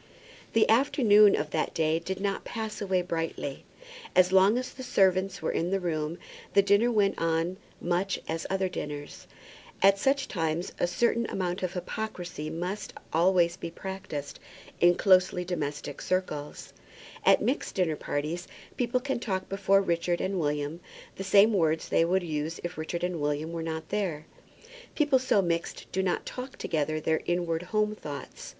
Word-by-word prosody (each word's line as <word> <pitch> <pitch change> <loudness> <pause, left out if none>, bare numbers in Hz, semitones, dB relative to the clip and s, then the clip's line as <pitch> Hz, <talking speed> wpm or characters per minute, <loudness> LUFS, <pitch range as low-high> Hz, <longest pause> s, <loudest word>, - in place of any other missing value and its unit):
The 225 - +4
afternoon 220 -4 +5
of 150 0 -3
that 155 - -1
day 160 0 +2
did 190 +3 -4
not 195 0 -1
pass 220 -2 -5
away 190 -3 +1
brightly. 165 -5 -4 0.5
As 185 0 +5
long 190 +4 +5
as 255 - -4
the 260 - -9
servants 190 -6 +2
were - - 0
in 170 - -1
the 195 +1 +1
room 160 -2 -2 0.4
the 200 - +6
dinner 205 +5 +4
went 205 -3 +2
on 165 +2 0 0.2
much 180 +3 0
as 165 0 -3
other 190 0 +1
dinners. 150 -5 -6 0.5
At 195 +1 +5
such 270 +4 +1
times 165 0 -2
a - - +2
certain 235 +4 +1
amount 180 -1 -2
of 185 -1 -2
hypocrisy 180 -4 -5
must 180 +5 -4 0.2
always 170 +1 +3
be - - -5
practised 170 -5 -6 0.4
in 175 0 +6
closely 185 -2 +4
domestic 145 -5 -4
circles. 150 -6 -3 0.5
At - - +5
mixed 260 - -1
dinner 175 -5 +1
parties 155 +5 -3 0.3
people 245 0 0
can 270 -1 -2
talk 190 -5 -3
before 195 0 +3
Richard 170 0 0
and 190 0 -1
William 150 +1 -1 0.4
the 195 - -4
same 200 +3 +5
words 160 -4 +2
that - - -2
they 165 - +5
would 185 +2 +1
use 155 0 -3
if 175 +1 -4
Richard 165 +2 -4
and 180 -3 -2
William 150 +2 -1
were 170 -1 -4
not 160 -1 -4
there. 170 -8 -2 0.7
People 290 -4 +3
so 250 -6 +2
mixed 170 -1 -2
do 190 - 0
not 185 -2 -1
talk 255 +1 -7
together 155 -1 -1
their 160 +1 0
inward 175 -2 0
home 215 -1 +1
thoughts. 145 -9 -8
180 Hz, 165 wpm, -28 LUFS, 160-200 Hz, 0.7 s, the